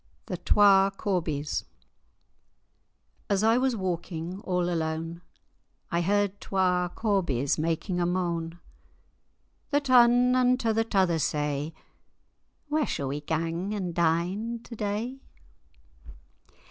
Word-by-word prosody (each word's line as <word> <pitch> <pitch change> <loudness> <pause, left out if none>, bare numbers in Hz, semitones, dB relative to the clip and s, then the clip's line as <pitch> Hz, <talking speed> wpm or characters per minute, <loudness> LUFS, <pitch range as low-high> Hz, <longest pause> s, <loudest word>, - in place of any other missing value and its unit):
THE 180 - -4
TWA 195 +1 +5
CORBIES 160 -8 -2 1.7
As 200 0 +1
I 225 +2 +4
was 260 -1 +1
walking 180 -2 -4
all 180 -4 -1
alane, 165 0 -3 0.7
I 170 0 +1
heard 200 +2 0
twa 180 -2 +1
corbies 170 - 0
making 165 +3 -1
a 175 - +1
mane;[#] 170 -2 -2 1.1
The 290 - +3
tane 250 -2 +5
unto 250 -2 +2
the 225 +1 +2
t'other 190 -7 +1
say, 150 +1 -1 0.9
"Where 300 0 0
sall 135 -2 -2
we 145 +2 -3
gang 165 +6 -2
and 185 -4 -3
dine 180 +8 0
to 235 - -10
day?" 215 +5 -3
185 Hz, 110 wpm, -27 LUFS, 165-215 Hz, 1.7 s, TWA